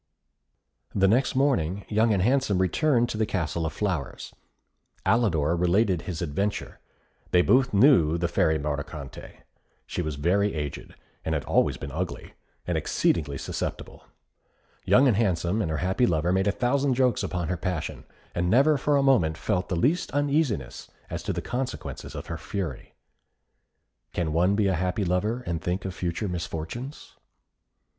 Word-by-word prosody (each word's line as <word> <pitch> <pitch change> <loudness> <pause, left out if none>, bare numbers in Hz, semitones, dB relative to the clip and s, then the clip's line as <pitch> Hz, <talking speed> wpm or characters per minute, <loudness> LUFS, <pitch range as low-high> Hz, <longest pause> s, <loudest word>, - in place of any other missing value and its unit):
The 95 -1 +4
next 125 +7 +2
morning, 100 - +1
Young 110 +2 +2
and 95 -3 +2
Handsome 125 -4 +2
returned 120 - +2
to 110 - -4
the 110 - +3
Castle 85 -4 -1
of 80 - -5
Flowers. 90 -9 -3 0.7
Alidor 85 -9 +2
related 90 +1 +2
his 85 -3 -4
adventure. 100 +7 -3 0.5
They 90 0 +4
both 130 +4 +3
knew 100 - +5
the 85 0 0
Fairy 80 -1 +2
Mordicante. 75 -1 -6 0.4
She - - -3
was 80 -4 -3
very 95 +7 +1
aged, 75 -2 -5 0.3
had 80 -3 -1
always - - +2
been - - -7
ugly, - - -5 0.3
and - - 0
exceedingly 70 -4 0
susceptible. - - -5 0.8
Young 105 +9 +5
and 115 -6 +3
Handsome 95 -1 +1
and 80 - -1
her 80 - -1
happy 95 +7 +2
lover 85 -1 +1
made 95 +1 +2
a - - +4
thousand 130 +4 +1
jokes 125 -1 +2
upon 90 -3 -3
her 90 - 0
passion, 90 -1 -4 0.3
and 90 0 0
never 140 +7 +4
for 145 +2 +2
a 140 - +2
moment 90 - +3
felt 90 +3 -1
the 90 - 0
least 145 - +1
uneasiness 145 - 0 0.2
as - - -3
to - - -3
the - - -3
consequences 130 +1 -5
of - - -6
her - - -5
fury. 90 -10 -5 1.2
Can 80 -3 -1
one 90 +5 +3
be 105 0 +2
a 95 - +2
happy 90 +3 -1
lover 105 +8 0
and 85 -1 -2
think 90 +2 -2
of 95 - -3
future 90 +3 -3
misfortunes? 90 - -6
95 Hz, 160 wpm, -26 LUFS, 85-120 Hz, 1.2 s, knew